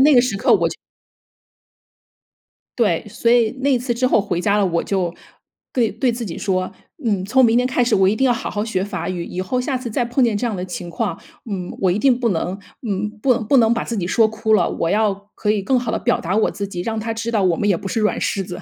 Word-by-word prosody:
在 - - +7
那 300 +1 +6
个 245 - +7
时 240 -5 -1
刻 - - +3
我 - - +2
就 - - -6 2.0
对， 200 -7 +2
所 230 - 0
以 235 -2 +4
那 270 0 +2
次 245 0 -3
之 245 +2 +1
后 225 -4 +3
回 180 -4 -2
家 200 +2 +2
了， 205 - +3
我 170 -2 0
就 185 -4 -1 0.6
对 235 -4 +2
对 235 +4 0
自 235 0 -4
己 175 -6 -6
说， 185 -2 -1 0.3
嗯， 200 -5 0
从 260 +6 +3
明 230 0 +4
天 250 - +2
开 255 -1 +1
始， 240 - +2
我 190 -1 +4
一 210 - +2
定 265 - 0
要 250 - +4
好 230 - -3
好 205 0 -2
学 195 -4 -1
法 195 -2 -4
语。 175 -2 -3
以 185 - -4
后 250 +7 -1
下 265 +2 -1
次 250 -2 -4
再 240 +2 0
碰 245 +2 +1
见 220 -3 +2
这 245 - -2
样 220 -4 -1
的 180 - -4
情 180 -1 -6
况， 210 +5 -3 0.3
嗯， 185 -3 -4
我 185 -2 +3
一 190 - 0
定 250 +1 +3
不 235 -3 +1
能 180 +2 -2 0.3
嗯， 205 +1 -1
不 255 +3 +3
不 270 +5 +4
能 230 -1 +5
把 230 - -2
自 230 - -4
己 175 - -1
说 220 +4 +3
哭 220 0 -1
了， 180 -5 +3
我 165 - -1
要 210 0 +3 0.2
可 210 - -3
以 210 -2 +1
更 255 +4 +2
好 245 - -3
地 - - 0
表 240 - 0
达 185 +5 -1
我 220 - +2
自 200 -1 -4
己， 175 -3 -5
让 220 +2 -2
他 225 +1 -3
知 225 +1 -3
道 215 -3 +1
我 180 -3 +3
们 205 - -1
也 195 - +3
不 195 - -6
是 225 - -1
软 215 - +1
柿 195 -2 -1
子。 175 - -7
215 Hz, 295 characters per minute, -20 LUFS, 190-240 Hz, 2.0 s, 在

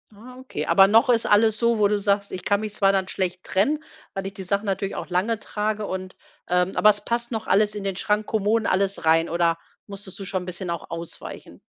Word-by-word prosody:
Ah, 250 +5 -13
okay, 260 - -5
aber 195 0 +6
noch 225 +4 +4
ist 230 -2 +3
alles 215 +1 +4
so, 235 -1 +2
wo 205 -1 +4
du 210 0 +1
sagst: 200 0 0
„Ich 185 - -6
kann 205 0 +2
mich 215 -1 -5
zwar 195 -2 +3
dann 190 -1 0
schlecht 185 -1 -2
trennen, 295 +11 0 0.3
weil 195 0 -4
ich 195 - -5
die 195 - -8
Sachen 200 +3 -1
natürlich 195 0 -2
auch - - -6
lange 190 +6 0
trage 210 0 -3
und, 185 -1 -5 0.3
ähm, 180 +1 +1
aber 210 - +6
es 205 0 +1
passt 235 +1 -2
noch 220 -1 -4
alles 210 +2 +3
in 205 - -5
den 195 -2 -3
Schrank, 210 +1 0
Kommoden 220 +1 0
alles 195 +1 0
rein." 165 +1 +3
Oder 170 0 +1 0.3
musstest 200 -1 -10
du - - -5
schon 185 -1 -3
'n - - -10
bisschen 180 0 -5
auch 170 -1 -5
ausweichen? 165 0 -8
200 Hz, 235 wpm, -24 LUFS, 185-215 Hz, 0.3 s, aber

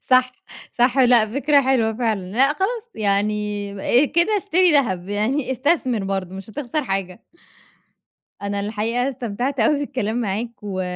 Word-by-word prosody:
صح، 255 0 +4 0.4
صح. 245 +2 +2
لا، 245 -4 +5
فكرة 285 +2 +3
حلوة 250 -4 +2
فعلًا، 220 -3 -1
لا 260 +5 +4
خلاص 455 +7 -3
يعني 205 +3 0
كده 340 +8 +2
اشتري 370 -3 +3
دهب، 195 -11 +1
يعني 245 +7 -1
استثمر 260 - 0
برضه 190 -1 -3
مش 195 +2 -9
هتخسر 290 +4 -3
حاجة. 195 -3 -4 1.2
أنا 200 0 -3
الحقيقة 225 +5 -1
استمتعت 250 +1 -3
أوي 280 +6 +3
بالكلام 240 -6 -2
معاك 220 +2 -2
و 190 -2 -3
240 Hz, 135 wpm, -21 LUFS, 205-275 Hz, 1.2 s, لا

